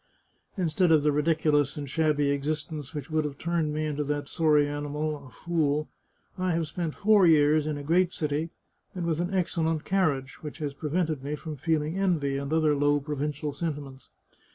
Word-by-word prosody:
" - - -43
Instead 180 0 +2
of 155 -2 +5
the 150 - +3
ridiculous 150 -1 +2
and 145 -1 -4
shabby 145 -1 +1
existence 150 0 -3
which 145 0 -6
would 155 0 +2
have 145 -2 -5
turned 170 -2 -1
me 155 +1 -1
into 150 -1 -1
that 145 0 -2
sorry 150 -3 +3
animal, 145 0 -3
a - - -13
fool, 155 -1 -1 0.5
I 185 -1 +1
have 165 -1 0
spent 165 0 -4
four 205 -3 +5
years 155 -1 +4
in 150 -1 -2
a 145 - -6
great 175 +4 +3
city, 155 0 -2 0.5
and 175 -2 -3
with 165 -1 0
an 175 +2 -1
excellent 165 -4 0
car 190 -3 +3
riage, 135 -2 -5
which 150 -2 -7
has 150 -4 -3
prevented 155 -1 -1
me 145 +2 -2
from 155 0 -7
feeling 160 +3 -1
envy, 155 -8 +1
and 140 +1 -4
other 155 -2 +3
low 145 +1 +3
provincial 150 0 -3
sentiments. 140 -3 -5
150 Hz, 190 wpm, -27 LUFS, 145-165 Hz, 0.5 s, of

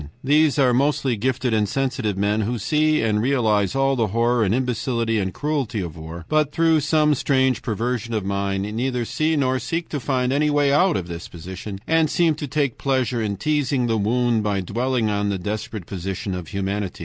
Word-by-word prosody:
These 150 +2 +3
are 130 -3 +4
mostly 135 -1 +1
gifted 125 +2 -1
and 105 -2 +1
sensitive 130 -6 -1
men, 105 +2 +1
who 120 +4 -1
see 155 +7 +1
and 105 -1 +1
realize 110 -6 +1
all 135 0 +2
the 115 -4 +1
horror 115 +3 +1
and 95 - +1
imbecility 115 -2 0
and 95 -1 -1
cruelty 140 -4 -2
of 85 -5 -5
war, 80 +1 -8
but 155 -2 +1
through 165 0 +3
some 150 +1 +3
strange 130 -3 +1
perversion 115 0 -2
of 105 -3 -2
mind 100 0 -1
neither 125 0 -1
see 155 +6 0
nor 130 -3 +1
seek 165 +5 -3
to 145 - -3
find 130 -1 0
any 150 +2 +2
way 145 -1 +2
out 180 +4 +3
of 90 - -4
this 85 -1 -7
position, 95 +4 -8
and 160 -1 +2
seem 170 -2 +2
to 150 -1 -5
take 140 -3 -1
pleasure 130 -3 0
in 100 -2 -2
teasing 145 -4 0
the 115 -1 +1
wound 115 +2 +1
by 105 -2 0
dwelling 120 +5 -1
on 100 0 0
the 100 - -1
desperate 105 +1 -5
position 95 +2 -4
of 90 -3 -5
humanity. 100 0 -3
120 Hz, 195 wpm, -22 LUFS, 105-140 Hz, -, are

